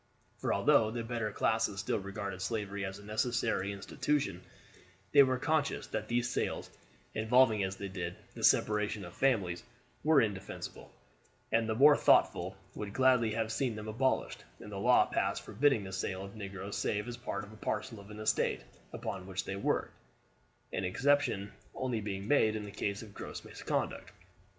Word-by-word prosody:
For - - -1
although 110 - +4
the 115 +1 -3
better 115 -2 -2
classes 110 -1 +1
still 105 - 0
regarded 100 -1 -5
slavery 100 -1 -2
as 95 0 -4
a 105 - -13
necessary 110 -2 0
institution, 100 0 -1 0.7
they 145 - +8
were 130 -2 +4
conscious 145 +1 0
that - - -4
these 120 +1 +1
sales, - - -2 0.4
involving 110 -1 +4
as 95 0 -2
they 100 - -5
did 95 - -4 0.2
the - - -8
separation 105 -1 +3
of 85 - -10
families, 100 -10 +1 0.4
were 155 -2 +6
indefensible, 100 -5 -3 0.6
and 115 0 +2
the 110 - +1
more 145 +5 +8
thoughtful - - +3 0.2
would 105 -1 -6
gladly 130 -3 +4
have 110 -1 -1
seen 120 0 0
them 105 0 -6
abolished, 130 +5 0 0.2
and 105 - -9
a - - -4
law 125 +5 +5
passed - - -1
forbidding 135 -6 +2
the 95 0 -7
sale 95 0 -2
of 100 - -11
negroes 100 -1 -6
save 105 +2 -1
as 120 - -4
part 120 - -4
and 110 +1 -14
parcel 110 +1 -3
of 100 - -12
the 105 0 -9
estate 110 - +1 0.3
upon 95 -1 -5
which 95 -1 -3
they 95 - -3
worked, 100 - 0 0.8
an - - -1
exception 100 -1 +1 0.2
only 125 -4 -1
being 100 -1 -4
made 110 -6 +4
in 105 -1 -4
the 100 - -8
case 100 +1 -2
of 105 -2 -12
gross - - -7
misconduct. - - -3
110 Hz, 170 wpm, -32 LUFS, 100-120 Hz, 0.8 s, they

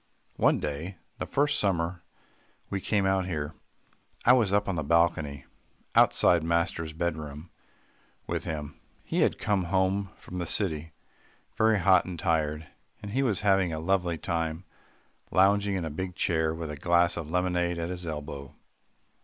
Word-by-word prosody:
One - - +3
day, 75 +6 -4 0.2
the - - -3
first 145 +1 +2
summer 85 -3 0 0.7
we 95 - -2
came 100 -1 +1
out 95 -1 +1
here, 75 -3 -3 0.7
I 125 - +8
was 115 -7 +3
up 105 +1 +2
on 95 - 0
the 80 - -1
balcony 80 -3 +1 0.5
outside 85 -2 +4
master's 85 -1 0
bed 85 0 -2
room 75 +2 -8 0.7
with - - -3
him. 75 -2 -5 0.2
He - - -2
had - - +2
come 100 -3 0
home 95 +2 +1
from 90 - -8
the 85 - -3
city 80 -5 0 0.6
very 110 -1 +3
hot 95 0 +5
and 90 -2 -6
tired, 80 -2 0 0.4
and 100 - -6
he 130 +5 +1
was 110 -8 +1
having 95 -4 +3
a 80 - -3
lovely 90 0 0
time 80 0 -2 0.6
lounging 100 +1 +3
in 90 -3 -2
a 80 - -4
big 90 +4 -5
chair 80 -2 +1
with 80 -1 -5
a - - -5
glass 85 +3 +3
of 80 -3 -5
lemonade 90 0 0
at 85 +1 -3
his 90 -1 -5
elbow. 75 -2 -6
85 Hz, 160 wpm, -28 LUFS, 80-95 Hz, 0.7 s, I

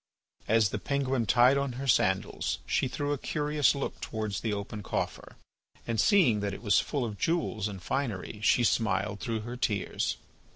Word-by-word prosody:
As 110 -2 +4
the 105 - -3
penguin 135 -2 -1
tied 125 +3 +5
on 140 -2 -2
her 135 +3 -5
sandals 95 -6 +1
she - - +1
threw 145 +3 -2
a 145 - -3
curious 150 -1 +1
look 140 - -4
towards 110 -3 -3
the 110 - -1
open 105 +1 -4
coffer, - - -4 0.5
and 115 -2 +1
seeing 165 - +4
that 100 -1 -2
it - - -11
was 105 -4 +4
full 140 -5 -2
of 105 -4 -6
jewels 120 - 0
and 95 -4 -8
finery, 115 -6 -3
she 120 +3 +4
smiled 105 -3 +1
through 115 -3 -2
her 120 +3 -6
tears. 105 -6 -1
115 Hz, 175 wpm, -29 LUFS, 105-135 Hz, 0.5 s, tied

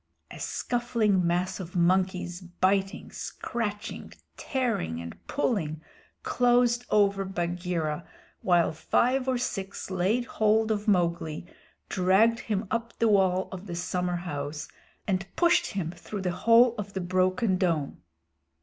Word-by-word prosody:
A - - -9
scuffling 225 -7 0
mass 180 +2 0
of 180 -1 -8
monkeys, 180 0 +1
biting, 190 +2 0
scratching, 210 -4 -5 0.2
tearing, 230 - -1
and 85 0 -7
pulling, 165 - -1 0.4
closed 245 0 +3
over 200 -1 +3
Bagheera, 175 -3 -2 0.4
while 175 -2 +3
five 255 - +1
or 260 -1 +2
six 195 -6 -4
laid 195 +7 +1
hold 220 0 +2
of 210 0 -2
Mowgli, 170 -4 +1 0.4
dragged 195 +5 +3
him 210 -1 -2
up 230 0 -2
the 230 - +3
wall 190 -2 +3
of 190 +1 -8
the 175 - -4
summerhouse 175 -5 -3 0.4
and 190 -1 -1
pushed 345 0 +4
him 185 -6 -3
through 185 +3 -7
the 180 -1 -1
hole 230 +6 +5
of 200 -1 -5
the 190 - -2
broken 185 +2 +1
dome. 160 - 0
190 Hz, 125 wpm, -28 LUFS, 175-220 Hz, 0.4 s, hole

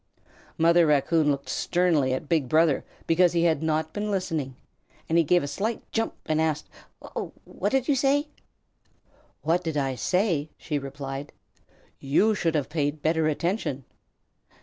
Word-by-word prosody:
Mother 170 0 +5
Raccoon 150 +1 +3
looked 140 -1 -1
sternly 165 -2 +1
at 130 +3 -3
Big 150 -6 +1
Brother 155 -1 +3 0.2
because 175 +1 +3
he 170 -1 +2
had 160 -3 +2
not 160 0 -1
been 210 0 -3
listening, 165 -9 -2 0.5
and 160 - 0
he 170 - +5
gave 175 +2 +3
a - - -3
slight 210 +10 -3
jump 225 - -1
and 155 0 +1
asked, 155 -2 -1 0.4
"W - - -6
what - - -3
did 265 -2 +1
you 290 - +4
say?" 280 +3 +2 1.2
"What 170 +3 +1
did 160 -3 -2
I 135 -2 0
say?" 165 - 0
she 150 -3 -3
replied. 140 0 -6 0.7
"You 175 +11 +3
should 165 -5 0
have 145 -3 0
paid 145 -1 -2
better 160 0 +2
attention." 155 - -2
160 Hz, 155 wpm, -26 LUFS, 145-175 Hz, 1.2 s, Mother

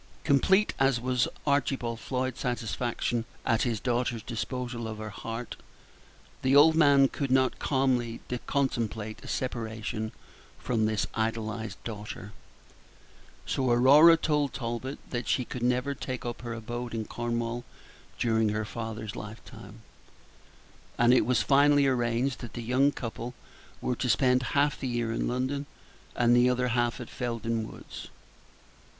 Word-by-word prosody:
Complete 190 +9 +3
as 135 -2 +3
was 125 0 +1 0.2
Archibald 135 -5 0
Floyd's 130 0 -2
satisfaction 120 -1 -1 0.2
at 115 -1 +2
his 115 -4 0
daughter's 120 -2 -1
disposal 120 0 -4
of 110 -1 -5
her 110 0 -6
heart, 115 +3 -6 0.8
the 130 +1 +3
old 155 +3 +8
man 140 -4 +6
could 140 0 -3
not 130 -1 +2
calmly 125 -4 +1 0.3
contemplate 115 -6 -1
a - - -10
separation 110 -3 -3 0.5
from 110 -3 0
this 110 -1 0
idolized 110 0 -2
daughter; 105 -1 -7 1.1
so 130 -2 0
Aurora 140 +7 +7
told 150 -4 0
Talbot 120 +3 -4
that 120 -1 -3
she 125 - +1
could 125 - -6
never 125 +3 +1
take 130 -2 -5
up 120 -1 -4
her 120 -2 -5
abode 120 +1 -5
in 110 -1 -2
Cornwall 120 +1 -3 0.5
during 110 -2 +2
her 105 +1 -1
father's 110 -1 -5
lifetime; 110 0 -10 1.1
and 120 +1 +5
it 130 - +4
was 125 - +3
finally 145 0 +5
arranged 125 0 +1
that 120 - -8
the 120 - -5
young 130 +4 +3
couple 120 -1 -6 0.5
were 125 - -1
to 125 - -1
spend 125 +2 +4 0.2
half 145 0 +2
the 130 - -3
year 120 -2 -1
in 115 - -1
London, 130 +3 -2 0.5
and 120 0 +4
the 120 +1 +5
other 125 0 +1
half 120 +1 0
at 120 - -6
Felden 115 -2 -3
Woods. - - -10
120 Hz, 140 wpm, -28 LUFS, 115-130 Hz, 1.1 s, old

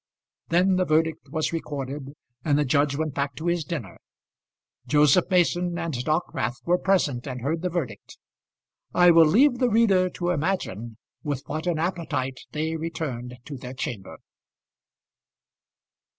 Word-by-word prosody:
Then 185 +2 +3
the 185 - +2
verdict 155 -2 0
was 155 +3 -1
recorded, 140 -3 -5 0.3
and 145 -3 +2
the 150 - +2
judge 140 +2 +2
went 155 -1 -2
back 140 -1 -2
to 160 - -7
his 175 -1 +1
dinner. 140 - -6 0.9
Joseph 150 +4 +4
Mason 175 -1 +2
and 170 -2 -3
Dockwrath 125 -3 -1
were 180 +1 +3
present 150 -10 +1
and 125 -2 -5
heard 160 +6 -1
the 180 - -1
verdict. 135 - -5 0.8
I 175 0 +7
will 165 -1 +7
leave 245 - +4
the 250 -2 +3
reader 200 -5 +4
to 175 0 -2
imagine 140 - -2 0.2
with 145 -3 -3
what 155 +4 -4
an 170 -3 +1
appetite 155 -6 -2
they 160 +2 -2
returned 145 -7 -4
to 145 -2 -7
their 125 +1 -8
chamber. 105 -6 -5
155 Hz, 145 wpm, -25 LUFS, 140-175 Hz, 0.9 s, I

